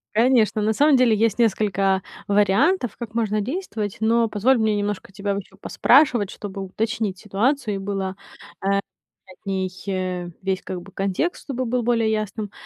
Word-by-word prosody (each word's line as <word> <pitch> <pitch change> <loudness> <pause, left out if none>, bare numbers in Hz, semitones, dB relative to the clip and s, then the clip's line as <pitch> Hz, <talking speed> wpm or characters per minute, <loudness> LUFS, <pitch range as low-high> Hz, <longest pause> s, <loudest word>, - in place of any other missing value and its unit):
Конечно, 230 -2 +3
на 220 +1 +2
самом 290 +3 +4
деле, 245 -4 +4
есть 225 +1 +1
несколько 195 -3 +2 0.3
вариантов, 210 - +2
как 230 -3 -7
можно 215 -2 +1
действовать, 220 - -3
но 230 +1 +3
позволь 225 +5 +2
мне 220 -2 +2
немножко 205 -1 -3
тебя 200 0 -2
вот 200 -1 -3
ещё - - -21
поспрашивать, 245 -9 +3
чтобы 200 -1 -7
уточнить 210 0 -2
ситуацию, 220 +3 0
и - - -2
было 195 -1 -3
э - - -19 1.0
от 185 - -20
них, 190 -1 -1 0.2
э, 185 -2 -2
весь 190 0 -1
как 180 -1 -6
бы 195 - -14
контекст, 195 - -2
чтобы 260 -2 -3
был 245 +1 0
более 230 -2 +2
ясным. 215 -1 -3
210 Hz, 165 wpm, -23 LUFS, 195-235 Hz, 1.0 s, самом